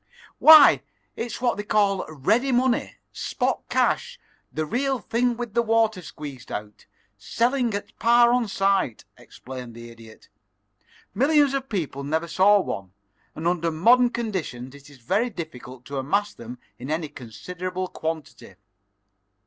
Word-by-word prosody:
"Why 310 -2 +9 0.3
it's 235 +1 -5
what 245 -4 +1
they 205 - -3
call 205 -2 +1
ready 220 - +1
money, 250 0 +1 0.2
spot - - -2
cash, 485 +1 0 0.3
the 155 - -2
real 265 - -1
thing 240 +1 -1
with 240 -3 -5
the 235 - +3
water 225 -3 +1
squeezed 145 -6 -10
out, 105 0 -7 0.3
selling 240 - 0
at 205 - -7
par 235 +1 +5
on 245 -2 +1
sight," 195 - 0
explained 125 -2 -10
the 120 0 -10
Idiot. 115 -1 -16 0.9
"Millions 285 +1 +3
of 270 -1 -3
people 155 -9 -3
never 160 +4 -1
saw 200 +4 +4
one, 95 - -6 0.4
and 160 +2 -3
under 170 -1 0
modern 235 +10 +4
conditions 180 - -4
it 140 0 -15
is 145 - -16
very 195 - 0
difficult 130 - -9
to 140 0 -6
amass 200 +10 -1
them 120 +2 -10 0.2
in 130 +3 -7
any 155 +1 -2
considerable 180 - -6
quantity. 160 - -6
185 Hz, 140 wpm, -24 LUFS, -, 0.9 s, Why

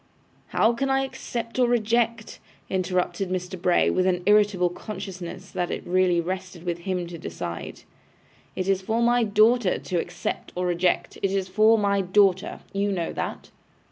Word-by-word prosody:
'How 225 - +3
can 270 +3 -1
I 270 0 +2
accept 245 -3 -5
or 250 - +5
reject,' 230 -1 0 0.3
interrupted 185 0 -1
Mr. 180 0 -4
Bray, 180 -1 +3
with 185 0 +1
an 180 -1 +1
irritable 205 -3 +4
consciousness 185 -1 -7
that 175 - -2
it - - -4
really 180 -1 +2
rested 185 0 -4
with 175 -1 -2
him 180 0 -2
to 170 -1 -8
decide. 85 - -6 0.7
'It 185 - -2
is 195 -1 +2
for 225 +4 0
my 240 +1 +4
daughter 215 0 +3
to 180 -2 -2
accept 175 +1 -4
or 180 0 -1
reject; 175 0 0
it 195 - +1
is 195 -1 -1
for 215 +4 +4
my 200 -1 +2
daughter. 190 0 +2
You 200 +1 0
know 175 -4 -2
that. - - -5
190 Hz, 165 wpm, -25 LUFS, 180-215 Hz, 0.7 s, or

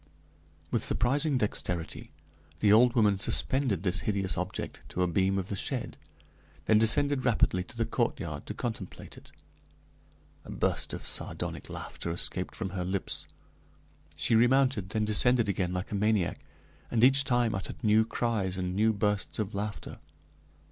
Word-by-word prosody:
With - - 0
surprising 140 +4 +2
dexterity 90 -6 -3 0.5
the 105 -1 +4
old 120 +3 +5
woman 105 -4 +3
suspended 125 - +2
this 95 0 +1
hideous 95 -5 -1
object 90 +2 -5
to 90 - -1
a - - +2
beam 95 +3 +1
of 95 -1 -3
the 100 - -2
shed, - - -3 0.7
then 110 -1 +4
descended 130 +5 +3
rapidly 105 -6 +2
to 115 - -15
the 115 - +1
courtyard 115 - -3
to - - -5
contemplate 110 -6 -6
it. - - -16 1.1
A - - -14
burst - - -1
of - - -6
sardonic - - -2
laughter - - -6
escaped 90 +2 0
from 95 -4 -4
her 90 -1 -3
lips; 95 +1 -4 0.9
she 80 - +1
remounted, 120 -3 +3
then 110 +1 -1
descended 115 +2 +3
again 95 -2 -1
like 90 +1 -4
a - - -2
maniac, 105 -3 +1 0.5
and 115 -1 +1
each 135 +2 +6
time 120 -4 +1
uttered 95 +6 -6
new 110 0 +4
cries 110 -5 -2
and 90 0 -3
new 110 +2 +3
bursts 105 -1 -1
of 105 -1 -3
laughter. 105 +1 -5
105 Hz, 155 wpm, -29 LUFS, 95-115 Hz, 1.1 s, each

